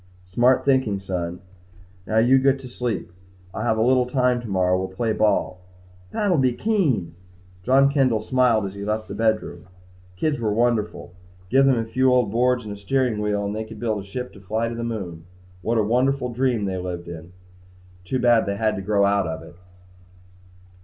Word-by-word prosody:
"Smart 120 +8 +2
thinking, 130 -8 +2
son. 90 -2 -4 0.7
Now 110 - 0
you 125 +4 +5
get 135 0 +2
to 130 - -9
sleep. 125 -6 -4 0.4
I'll - - -4
have 110 -1 +1
a 110 - +2
little 125 0 +3
time 125 -1 +1
tomorrow. 95 -5 +1
We'll 95 0 -1
play 110 +5 -2
some - - -2
ball." 100 -3 +1 0.5
"That 205 - 0
will 170 - +3
be 130 -2 +2
keen!" 150 - 0 0.5
John 135 +6 +4
Kendall 130 -6 +1
smiled 125 -4 +2
as 95 - -5
he 100 0 -7
left 110 +1 -2
the - - -7
bedroom. 110 -6 -1 0.5
Kids 145 +9 -1
were 110 -2 0
wonderful! 110 -5 -1 0.4
Give 135 +2 +5
them 130 -2 +4
a 115 - -1
few 130 +3 +2
old 125 -5 +2
boards 125 +2 +2
and 105 - -5
a - - -9
steering 120 +2 0
wheel 105 -1 -1
and 100 +1 -3
they 110 - -3
could 110 -1 -11
build 110 -3 -1
a - - -10
ship 125 +5 -6
to 100 - -14
fly 110 +4 -2
to - - -5
the 115 0 -5
moon. 95 -8 -5 0.4
What 115 +5 0
a 110 - +3
wonderful 125 +4 +1
dream 120 -4 0
world - - -1
they 95 - -3
lived 90 -1 -6
in! 85 +1 -9 0.7
Too 110 +8 -2
bad 120 -4 +3
they 100 - -1
had 110 0 +1
to - - -4
grow 100 0 +2
out 100 -2 +2
of 80 0 -5
it. 80 +1 -13
110 Hz, 205 wpm, -23 LUFS, 100-125 Hz, 0.7 s, you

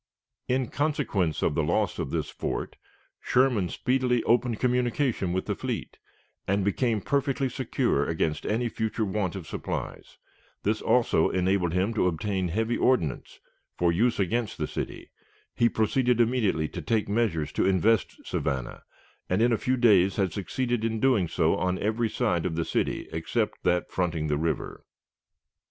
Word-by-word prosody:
In 130 -1 0
consequence 130 - 0
of - - +2
the - - +1
loss - - 0
of - - -2
this - - -2
fort, - - -4 0.4
Sherman 120 -8 +2
speedily 125 -2 +1
opened 120 -1 +2
communication 125 -5 0
with 95 +1 -1
the - - -1
fleet, - - -5 0.5
and 100 0 +1
became 110 +1 +1
perfectly 140 +1 0
secure 125 - 0
against 80 -1 -1
any 115 +3 0
future 110 -1 -2
want 95 -2 -2
of 95 -4 -6
supplies. - - -5 0.5
This 110 +2 0
also 120 -9 +3
enabled 90 -2 +1
him 95 +5 +1
to 105 - +2
obtain 95 +2 -1
heavy 110 +7 0
ordnance 85 - 0 0.4
for 85 -1 +3
use 115 +7 +1
against 110 +4 -1
the - - -1
city. - - -6 0.4
He 120 - +3
proceeded 120 +3 +1
immediately 110 -10 +2
to 85 - -6
take 110 +7 0
measures 100 -9 0
to - - +1
invest 95 +3 +1
Savannah, 65 -3 -3 0.5
and 90 - +1
in 120 +1 +4
a - - +4
few 130 0 0
days 100 -6 +4
had 95 -5 0
succeeded 120 +3 -2
in 115 -1 -1
doing 115 -8 +3
so - - +1
on 90 0 0
every 110 +3 0
side 85 -4 0
of 80 - -3
the 85 0 -1
city - - -1
except 105 +7 -2
that 90 0 +1
fronting 85 -4 -1
the 75 - +1
river. 80 0 -3
105 Hz, 160 wpm, -27 LUFS, 90-120 Hz, 0.5 s, in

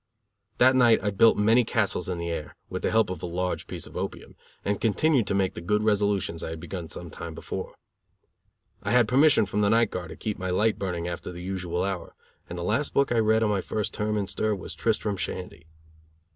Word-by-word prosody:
That 130 +1 +5
night 120 -3 +6
I 105 - +1
built 110 +3 +5
many 115 +4 +4
castles 105 -5 0
in 90 - -2
the 85 0 -3
air, 75 -3 -5 0.2
with - - -3
the - - +1
help 110 -4 +2
of 95 - -5
a - - -3
large 90 +1 -2
piece - - -5
of - - -13
opium: - - -5 0.3
and 100 0 -1
continued 120 +2 +2
to 100 - 0
make 95 -1 +1
the - - -7
good 105 +5 +1
resolutions 100 -5 +1
I - - -4
had 80 0 -6
begun 85 0 -6
some - - -6
time - - -7
before. - - -6 1.1
I - - -3
had 120 -2 +4
permission 135 0 +5
from 105 +2 -1
the 100 - +3
night 115 0 +3
guard 90 -2 -5
to - - -8
keep 105 -1 -4
my 95 0 -3
light 105 +5 +1
burning 90 -3 -2
after 85 +1 -5
the 90 0 -8
usual 90 -2 -2
hour, 95 -3 -4 0.3
and 90 - -6
the 85 - -4
last 115 +10 0
book 140 -2 +3
I 120 - +3
read 110 0 +3
on 105 - +2
my 100 -2 +1
first 105 +2 -3
term 105 0 -1
in 100 - 0
stir 110 +2 -1
was 95 - -8
Tristram 105 -3 -1
Shandy. 90 -3 -5
100 Hz, 225 wpm, -26 LUFS, 90-110 Hz, 1.1 s, night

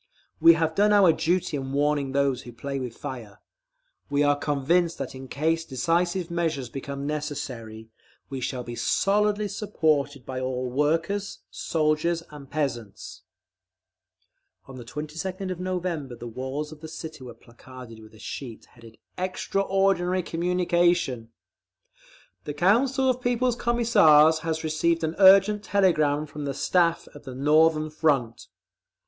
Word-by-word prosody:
We 165 - +8
have 160 -1 0
done 205 +4 +3
our 195 -5 +6
duty 175 -1 0
in 135 0 -5
warning 145 -1 +1
those 135 -2 +1
who 120 - -11
play 135 +4 -5
with 125 -3 -6
fire. 120 -8 -8 0.7
We 145 +1 +2
are 145 0 +3
convinced 150 +4 0
that - - -5
in 130 0 -9
case 160 +5 0
decisive 170 +5 -1
measures 160 -7 -2
become 140 +2 -6
necessary, 130 -7 -5 0.4
we 135 -1 -6
shall 125 0 -3
be 120 0 -7
solidly 210 - +1
supported 145 - -1
by 130 -1 -5
all 130 -1 -3
workers, 165 +9 -1
soldiers, 160 +1 0
and 145 -2 -11
peasants. 120 -9 -4 1.4
On 135 -1 -11
the 125 - -8
22d 165 - -5
of 180 - -5
November 175 -8 -3
the 120 - -10
walls 130 +6 -5
of 155 - -11
the 160 - -7
city 160 -2 -8
were 125 - -10
placarded 120 -1 -13
with 110 0 -15
a - - -16
sheet 120 0 -8
headed 115 -1 -16 0.2
"EXTRAORDINARY 185 -1 0
COMMUNICATION": 175 -8 0 1.2
The 145 - -5
Council 255 - +2
of 255 -1 +1
People's 245 0 +1
Commissars 205 -11 +4
has 160 0 -3
received 165 +1 0
an 160 0 -1
urgent 195 +2 +6
telegram 155 -8 +2
from 150 -1 -7
the 140 -1 -3
Staff 170 +2 +1
of 145 - -14
the 130 -3 -8
Northern 155 +2 +3
Front…. 135 -7 0
155 Hz, 140 wpm, -25 LUFS, 135-175 Hz, 1.4 s, We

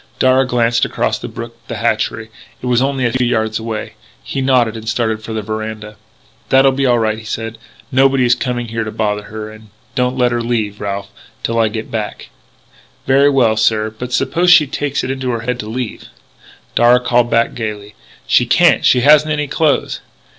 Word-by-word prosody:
Darragh 130 0 +3
glanced 120 -1 +1
across - - -1
the - - -6
brook 115 0 -8
at - - -33
the - - -5
hatchery. 115 0 -1 0.3
It - - -9
was 125 -1 +2
only 135 -1 0
a 120 - +1
few 125 -1 +1
yards 110 -2 0
away. 110 -1 -5 0.3
He 135 - -4
nodded 125 -4 +2
and 110 0 -5
started 110 -2 -1
for 110 - -8
the 110 -1 -3
veranda: 110 0 -5 0.5
"That'll 135 0 +5
be 135 0 0
all 120 -1 +3
right," 110 -1 0
he - - -12
said. 115 0 -5 0.3
"Nobody 135 0 +3
is 120 - +4
coming 120 -2 -3
here 115 0 -2
to 110 - -5
bother 105 -1 -2
her.... 110 0 -7
And 110 0 -15 0.2
don't 125 +1 0
let 125 -1 +2
her 120 0 -1
leave, 110 -3 -2
Ralph, 100 0 -4 0.3
till 115 0 -1
I 115 - +3
get 110 +1 -6
back 110 -2 -5 0.4
" - - -31
"Very 135 +2 +4
well, 125 -6 +3
sir. 110 0 +1
But 125 +3 -7
suppose 175 +7 +1
she 175 -4 +7
takes 145 0 -2
it 130 - -2
into 130 -1 -3
her 115 -2 -2
head 125 +1 -3
to 105 - -6
leave 120 -1 -5 0.4
" - - -25
Darragh 125 +1 +4
called 120 -1 +2
back, 115 0 +2
gaily: 105 -2 -5 0.3
"She - - +3
can't: - - +4
she 125 - +4
hasn't 150 +3 +5
any 150 0 0
clothes!" 150 +1 0
120 Hz, 205 wpm, -16 LUFS, 110-130 Hz, 0.5 s, she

